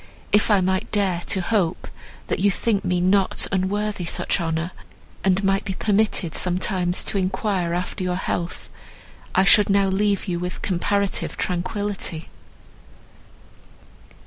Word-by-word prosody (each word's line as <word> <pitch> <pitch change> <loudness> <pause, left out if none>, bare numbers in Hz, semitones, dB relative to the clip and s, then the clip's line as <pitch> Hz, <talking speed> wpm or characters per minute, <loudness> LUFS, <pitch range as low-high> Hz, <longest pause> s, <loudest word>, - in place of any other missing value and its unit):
If 205 +2 +4
I 205 -3 +4
might 190 0 -1
dare 195 -4 +1
to 190 - +1
hope, 185 -3 0 0.4
that - - -2
you 200 +2 +4
think 200 +1 0
me 180 0 0
not 190 +2 +2
unworthy 195 +1 -1
such 170 - +1
honour, 165 +1 -2 0.5
and 190 +1 +2
might 195 0 +2
be 190 - -4
permitted 205 -5 0
sometimes 180 0 0
to 200 - -1
enquire 190 -2 -1
after 180 +2 -3
your 180 -1 -1
health, 175 -1 -3 0.7
I 190 - +5
should 205 +1 +6
now 200 0 +3
leave 200 +1 0
you 175 -2 -1
with 180 +1 -5
comparative 200 +2 -1
tranquillity." 185 -2 -3
190 Hz, 135 wpm, -23 LUFS, 180-200 Hz, 0.7 s, should